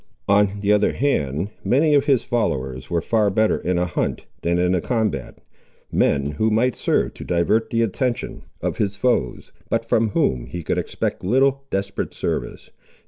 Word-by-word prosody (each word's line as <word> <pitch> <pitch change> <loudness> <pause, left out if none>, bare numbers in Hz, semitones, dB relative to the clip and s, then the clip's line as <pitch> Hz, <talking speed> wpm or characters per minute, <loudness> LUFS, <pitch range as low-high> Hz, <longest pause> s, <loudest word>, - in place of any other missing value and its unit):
On 100 0 +3
the 100 0 +2
other 105 0 +2
hand, 85 - 0
many 150 +4 +3
of 140 -2 +4
his 135 -4 +3
followers 65 - -2
were 85 -1 0
far 110 -3 +2
better 110 +2 +2
in 90 0 -1
a 90 - +1
hunt 85 - -2 0.2
than 85 +1 +1
in 90 +1 +2
a 90 - +1
combat; 110 - -2 0.5
men 70 -1 +2
who 110 +10 +1
might 115 +3 +2
serve - - 0
to - - -9
divert 90 +6 +1
the 115 0 +1
attention 120 +3 -2 0.2
of - - -2
his 100 -1 -1
foes, 100 - 0 0.2
but - - 0
from 110 0 +2
whom 65 -10 0
he 85 +1 -6
could - - 0
expect - - -3
little 135 +6 +2
desperate 100 0 -3
service. - - -4
105 Hz, 175 wpm, -22 LUFS, 85-120 Hz, 0.5 s, of